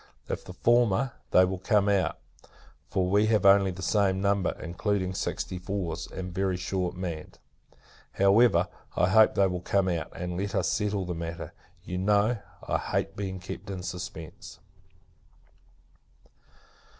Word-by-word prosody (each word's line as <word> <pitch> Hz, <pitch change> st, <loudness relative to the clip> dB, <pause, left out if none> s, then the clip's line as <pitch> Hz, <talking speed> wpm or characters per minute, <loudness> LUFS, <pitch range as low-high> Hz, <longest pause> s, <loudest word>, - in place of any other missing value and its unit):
If -, -, -4 dB
the 90 Hz, -, -10 dB
former, 120 Hz, +3 st, +3 dB, 0.2 s
they 90 Hz, -, +6 dB
will 95 Hz, 0 st, -3 dB
come 105 Hz, +1 st, +2 dB
out; 95 Hz, -5 st, +1 dB, 0.7 s
for 95 Hz, -1 st, 0 dB
we 100 Hz, +3 st, +3 dB
have 110 Hz, -3 st, +2 dB
only 100 Hz, 0 st, +6 dB
the 95 Hz, +1 st, -6 dB
same 95 Hz, -2 st, +2 dB
number, 100 Hz, 0 st, +1 dB
including 95 Hz, +2 st, -2 dB
sixty 90 Hz, 0 st, -3 dB
fours, 90 Hz, -3 st, -4 dB
and 90 Hz, -2 st, -7 dB
very 95 Hz, -1 st, 0 dB
shortly 90 Hz, 0 st, -3 dB
manned. 85 Hz, -4 st, -5 dB, 0.8 s
However, 100 Hz, -2 st, +4 dB, 0.3 s
I 90 Hz, -, +3 dB
hope 110 Hz, +3 st, +5 dB
they 100 Hz, -, +4 dB
will 90 Hz, -2 st, -2 dB
come 95 Hz, +1 st, +1 dB
out, 85 Hz, -4 st, -2 dB
and 90 Hz, -1 st, -4 dB
let 100 Hz, +1 st, -3 dB
us -, -, +1 dB
settle 105 Hz, -3 st, -1 dB
the 90 Hz, -, -3 dB
matter. 85 Hz, +1 st, -6 dB, 0.3 s
You 90 Hz, 0 st, -4 dB
know, 105 Hz, +4 st, +2 dB, 0.3 s
I -, -, +1 dB
hate -, -, -2 dB
being 95 Hz, -2 st, -4 dB
kept 95 Hz, +2 st, -8 dB
in 95 Hz, -2 st, -5 dB
suspence. 85 Hz, -3 st, -7 dB
95 Hz, 150 wpm, -28 LUFS, 90-100 Hz, 0.8 s, they